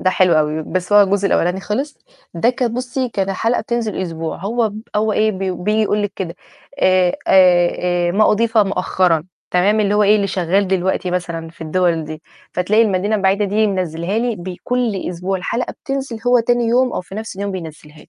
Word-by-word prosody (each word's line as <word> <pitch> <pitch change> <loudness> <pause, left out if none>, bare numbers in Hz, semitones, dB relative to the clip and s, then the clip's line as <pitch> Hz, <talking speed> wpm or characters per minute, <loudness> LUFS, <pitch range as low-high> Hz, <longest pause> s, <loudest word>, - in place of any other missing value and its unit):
ده 185 - +2
حلو 185 -1 +3
أوي، 155 0 +1
بس 180 +4 -3
هو 205 0 +8
الجزء 200 0 +1
الأولاني 180 0 +1
خِلِص، 270 +9 -3 0.4
ده 200 +8 +2
كان 245 -2 -2
بُصّي 250 +1 -2
كان 195 -4 -2
الحلقة 225 +5 0
بتنزل 225 -3 -2
أسبوع، 165 -2 -4
هو 225 +5 0
ب 210 +1 -8 0.2
هو 215 +1 +1
إيه 215 +1 +2
بي 190 -1 -3
بييجي 210 +5 0
يقول 210 0 0
لِك 205 -1 -2
كده، 180 -2 -5 0.5
آآ 185 -1 +3
آآ 175 -1 +3
آآ - - -1
ما 210 +3 +4
أُضيف 225 +1 +1
مؤخرًا، 180 -4 +1 0.3
تمام، 200 +4 +2
اللي 205 -1 +1
هو 210 - +3
إيه 210 +1 +5
اللي 200 -1 0
شغال 190 +1 0
دلوقتي 190 -1 0
مثلًا 170 -2 -4
في 170 - -24
الدِوَل 165 0 0
دي، 155 0 -8 0.3
فتلاقي 200 +5 +2
المدينة 205 0 +1
البعيدة 195 +1 +1
دي 210 +2 +1
منزِّلها 185 0 -2
لي 235 -1 -1
بكل 200 +4 -3
أسبوع، 180 +2 -3
الحلقة 235 +7 -3
بتنزل 270 -4 -3
هو 245 0 +5
تاني 240 +1 +1
يوم 250 +2 +2
أو - - -2
في 185 +1 -12
نفس 220 -1 -6
اليوم 200 +1 -3
بينزّلها 155 -4 -9
لي. - - -17
195 Hz, 200 wpm, -18 LUFS, 180-220 Hz, 0.5 s, هو